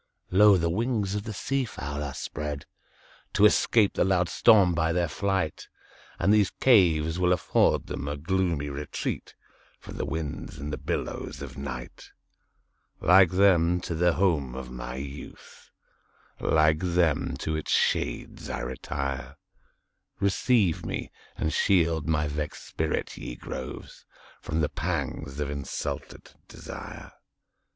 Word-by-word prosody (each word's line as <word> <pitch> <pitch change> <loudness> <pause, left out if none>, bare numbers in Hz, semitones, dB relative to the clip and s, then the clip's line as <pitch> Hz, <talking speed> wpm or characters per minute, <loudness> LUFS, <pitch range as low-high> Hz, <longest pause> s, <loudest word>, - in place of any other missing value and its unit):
Lo! 100 +1 +7
the 85 -1 0
wings 105 +2 0
of 105 0 -3
the 110 - -4
sea 135 +6 -1
fowl 70 - -5
are 70 -2 -4
spreadTo 75 +8 -4
escape 105 0 +4
the - - +2
loud 90 -2 +2
storm 95 -5 +5
by 80 0 +1
their 85 0 +1
flight; 95 -1 -2 0.5
And 100 - +3
these 105 -3 +4
caves 85 -9 +4
will 90 0 +3
afford 90 - +2
them 70 - -5
a 75 0 -3
gloomy 85 -1 0
retreatFrom 70 +1 -4 0.6
the - - -2
winds 80 -2 -5
and 75 +2 -5
the 75 - -4
billows - - -4
of - - -8
night; 65 -3 -7 0.9
Like 90 0 +6
them, 90 -2 +4
to 85 - -4
the 85 +1 +3
home 75 -10 +1
of 65 -1 -7
my - - -6
youth, 70 +2 -9 0.7
Like 75 0 +3
them, 85 -4 +1
to 80 - -2
its 80 - -4
shades - - 0
I - - -3
retire; 70 +2 -4 0.8
Receive 100 -2 +2
me, - - -4 0.3
and 80 - -1
shield 85 -4 +2
my 75 -2 +1
vexed 75 +1 -4
spirit, 80 0 -2
ye - - -6
groves, 65 - -8 0.4
From 80 +2 -2
the 75 - +1
pangs 75 -3 -3
of 70 -1 -2
insulted 70 -1 -5 0.2
desire! - - -9
80 Hz, 135 wpm, -27 LUFS, 75-95 Hz, 0.9 s, Lo